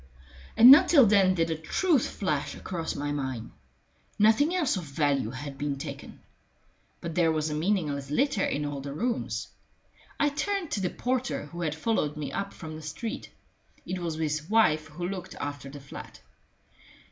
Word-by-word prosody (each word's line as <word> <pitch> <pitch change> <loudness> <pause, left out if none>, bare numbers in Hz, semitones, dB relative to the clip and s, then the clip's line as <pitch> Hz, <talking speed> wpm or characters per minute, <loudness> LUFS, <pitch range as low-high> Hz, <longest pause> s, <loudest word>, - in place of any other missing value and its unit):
And 240 +3 +11
not 330 +6 +9
till 285 -7 +7
then 195 -3 +4
did 165 -1 +1
the 160 - 0
truth 280 - +1
flash 150 -8 -2
across 170 -3 -4
my 145 0 -2
mind. 130 -5 -4 0.7
Nothing 225 - +4
else 315 -10 +1
of 185 - -3
value 140 -4 0
had 135 +2 -7
been 145 -1 -2
taken. 135 - -8 0.8
But 170 -1 -5
there 165 -1 +3
was 155 -1 -1
a - - -2
meaningless 150 -5 -1
litter 215 - +1
in 145 +1 -1
all 145 -1 -4
the 140 0 -6
rooms. 235 - -2 0.7
I 290 - +4
turned 340 +4 -2
to - - 0
the 180 - 0
porter, 250 - -2
who 170 +4 -8
had 155 -2 -1
followed 160 -5 -1
me 150 -2 -4
up 200 0 -3
from 160 -3 -8
the 155 - -8
street; 220 - -5 0.6
it 185 0 -3
was 170 -2 -3
his 155 0 -2
wife 155 -9 +3
who 175 +3 -5
looked 185 -1 -6
after 145 -1 -5
the 145 +1 -9
flat. 140 0 -11
165 Hz, 175 wpm, -28 LUFS, 145-220 Hz, 0.8 s, And